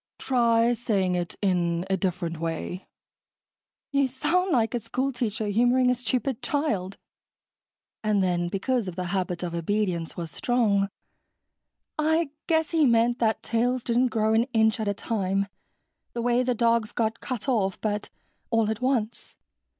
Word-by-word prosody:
"Try 235 Hz, -2 st, +3 dB
saying 205 Hz, -6 st, 0 dB
it 175 Hz, -1 st, -2 dB
in 175 Hz, -2 st, +1 dB
a 195 Hz, -, +1 dB
different 175 Hz, -3 st, -2 dB
way." 165 Hz, +3 st, -4 dB, 1.0 s
"You 280 Hz, -1 st, +3 dB
sound 355 Hz, +9 st, 0 dB
like 230 Hz, -4 st, +2 dB
a 240 Hz, -, 0 dB
school 260 Hz, +5 st, -2 dB
teacher 225 Hz, -4 st, -2 dB
humoring 245 Hz, +4 st, +3 dB
a -, -, +4 dB
stupid 250 Hz, +1 st, -2 dB
child." 210 Hz, -11 st, -1 dB, 1.1 s
And 210 Hz, -2 st, +2 dB
then, 175 Hz, -1 st, +1 dB
because 215 Hz, +5 st, -1 dB
of 180 Hz, -, -5 dB
the 185 Hz, -, -3 dB
habit 180 Hz, -2 st, -1 dB
of 175 Hz, -1 st, -3 dB
obedience 170 Hz, -1 st, -1 dB
was 165 Hz, -2 st, -4 dB
strong, 205 Hz, -4 st, +1 dB, 1.1 s
"I 320 Hz, 0 st, +2 dB, 0.2 s
guess 320 Hz, -2 st, +1 dB
he 320 Hz, -4 st, +4 dB
meant 235 Hz, +1 st, +3 dB
that 220 Hz, -2 st, +1 dB
tails 245 Hz, +2 st, 0 dB
didn't 245 Hz, +2 st, +2 dB
grow 220 Hz, -2 st, +1 dB
an 225 Hz, +1 st, +3 dB
inch 220 Hz, 0 st, +3 dB
at 215 Hz, -, -2 dB
a 205 Hz, -, 0 dB
time, 195 Hz, -2 st, -1 dB, 0.7 s
the 235 Hz, -, -3 dB
way 245 Hz, +1 st, +3 dB
the 250 Hz, -1 st, 0 dB
dog's 230 Hz, -1 st, +2 dB
got 225 Hz, 0 st, -1 dB
cut 255 Hz, -1 st, -5 dB
off, 205 Hz, -7 st, +1 dB
but 210 Hz, -1 st, -2 dB, 0.4 s
all 225 Hz, -2 st, +2 dB
at 220 Hz, +2 st, -4 dB
once 250 Hz, -4 st, -1 dB
225 Hz, 155 wpm, -26 LUFS, 195-245 Hz, 1.1 s, a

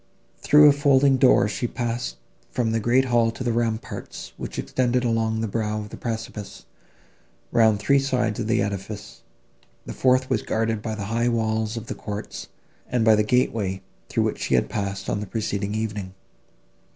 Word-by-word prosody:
Through 150 Hz, 0 st, +7 dB
a -, -, +8 dB
folding 140 Hz, -1 st, +4 dB
door 130 Hz, -4 st, +5 dB
she 115 Hz, +3 st, -2 dB
passed 120 Hz, -, -3 dB, 0.3 s
from 115 Hz, -3 st, -1 dB
the 115 Hz, -, +1 dB
great 120 Hz, +4 st, +3 dB
hall 120 Hz, -2 st, +3 dB
to 115 Hz, +3 st, -6 dB
the 120 Hz, -2 st, 0 dB
ramparts, 115 Hz, -1 st, -3 dB
which -, -, -7 dB
extended 125 Hz, -1 st, 0 dB
along 110 Hz, -1 st, 0 dB
the 115 Hz, -, -1 dB
brow 110 Hz, 0 st, -2 dB
of 105 Hz, 0 st, -7 dB
the -, -, -8 dB
precipice, 110 Hz, -3 st, -6 dB, 0.9 s
round 110 Hz, -2 st, +4 dB
three 140 Hz, +7 st, +3 dB
sides 125 Hz, -5 st, 0 dB
of 110 Hz, -, -2 dB
the 115 Hz, -2 st, +2 dB
edifice; 100 Hz, -, -6 dB, 0.6 s
the -, -, -6 dB
fourth 130 Hz, 0 st, +2 dB
was 130 Hz, -5 st, 0 dB
guarded 110 Hz, -1 st, -1 dB
by 110 Hz, -1 st, -3 dB
the 100 Hz, -2 st, -5 dB
high 115 Hz, +1 st, +2 dB
walls 110 Hz, -1 st, -1 dB
of 115 Hz, -, -5 dB
the -, -, -4 dB
courts, 105 Hz, 0 st, -6 dB, 0.4 s
and 120 Hz, -3 st, 0 dB
by 110 Hz, -, +7 dB
the 105 Hz, -, +4 dB
gateway, 105 Hz, -4 st, 0 dB, 0.3 s
through -, -, +1 dB
which -, -, -2 dB
she 65 Hz, -, +1 dB
had 60 Hz, -, +1 dB
passed, 100 Hz, -1 st, -3 dB
on 100 Hz, -, -1 dB
the 105 Hz, -, -5 dB
preceding 105 Hz, -1 st, -2 dB
evening. 105 Hz, -4 st, -4 dB
115 Hz, 180 wpm, -24 LUFS, 105-120 Hz, 0.9 s, a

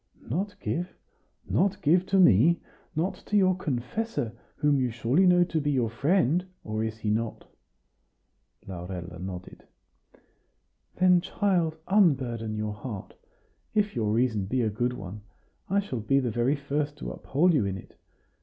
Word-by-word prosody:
"Not 195 Hz, -, -3 dB
give! 175 Hz, +2 st, -3 dB, 0.5 s
not 195 Hz, 0 st, +1 dB
give 175 Hz, +5 st, +4 dB
to 195 Hz, 0 st, +2 dB
me? 165 Hz, -, +6 dB, 0.4 s
not 165 Hz, +5 st, 0 dB
to 210 Hz, -, +2 dB
your 185 Hz, -2 st, +4 dB
confessor, 140 Hz, -, -3 dB, 0.2 s
whom 145 Hz, -2 st, +2 dB
you 125 Hz, -1 st, +1 dB
surely 120 Hz, +11 st, +2 dB
know 180 Hz, 0 st, +6 dB
to 165 Hz, -2 st, -1 dB
be 145 Hz, -, 0 dB
your 125 Hz, -6 st, +1 dB
friend 170 Hz, +5 st, +2 dB, 0.2 s
or 110 Hz, +1 st, -2 dB
is 110 Hz, 0 st, -3 dB
he 110 Hz, -1 st, -1 dB
not?" 115 Hz, +1 st, -2 dB, 1.2 s
Laurella 90 Hz, -1 st, -7 dB
nodded. 90 Hz, -1 st, -8 dB, 1.3 s
"Then, 180 Hz, -1 st, +5 dB
child, 180 Hz, -4 st, 0 dB
unburden 130 Hz, -, +2 dB
your 105 Hz, 0 st, -2 dB
heart. 105 Hz, -2 st, -7 dB, 0.6 s
If 210 Hz, -5 st, +1 dB
your 110 Hz, -3 st, 0 dB
reason 110 Hz, -3 st, +1 dB
be 125 Hz, +5 st, 0 dB
a 110 Hz, -, 0 dB
good 120 Hz, +4 st, -1 dB
one, 100 Hz, -2 st, -8 dB, 0.5 s
I 200 Hz, +2 st, +3 dB
shall 165 Hz, -, -3 dB
be 125 Hz, +6 st, +2 dB
the 125 Hz, -3 st, -1 dB
very 120 Hz, +6 st, +1 dB
first 145 Hz, +1 st, -2 dB
to -, -, -5 dB
uphold 170 Hz, +6 st, +2 dB
you 115 Hz, -10 st, +2 dB
in 95 Hz, -1 st, -3 dB
it. -, -, -13 dB
135 Hz, 155 wpm, -27 LUFS, 110-175 Hz, 1.3 s, me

